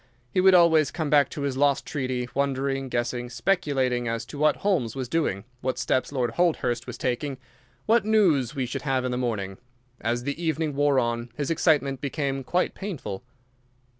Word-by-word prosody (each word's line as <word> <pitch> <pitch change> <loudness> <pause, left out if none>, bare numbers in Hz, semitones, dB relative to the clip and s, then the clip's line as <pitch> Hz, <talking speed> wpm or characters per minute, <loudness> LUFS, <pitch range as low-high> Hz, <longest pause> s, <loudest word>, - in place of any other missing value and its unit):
He 185 - +2
would 190 0 +6
always 160 -4 +5
come 155 -1 -3
back 145 -2 +5
to 145 - -6
his 140 -2 -2
lost 140 0 +2
treaty, 130 -4 -2
wondering, 135 -1 -1
guessing, 120 0 -2
speculating, 135 -8 0
as 115 0 -2
to 145 - -9
what 150 0 +4
Holmes 165 - 0
was 130 -2 -3
doing, 120 - -1 0.2
what 130 0 -1
steps 130 0 0
Lord 125 -4 0
Holdhurst 125 -6 0
was - - -6
taking, 130 +2 -2 0.5
what 225 0 +4
news 175 - +3
we 130 -2 -1
should 120 - -4
have 135 -3 0
in 125 - -1
the - - -1
morning. 100 -6 -3 0.4
As 120 +2 -1
the 140 +5 -4
evening 160 -2 0
wore 145 0 +2
on 120 -1 0
his 145 +2 -2
excitement 140 -5 +2
became 140 -1 -2
quite 180 +7 0
painful. 170 - -5
135 Hz, 180 wpm, -26 LUFS, 125-155 Hz, 0.5 s, would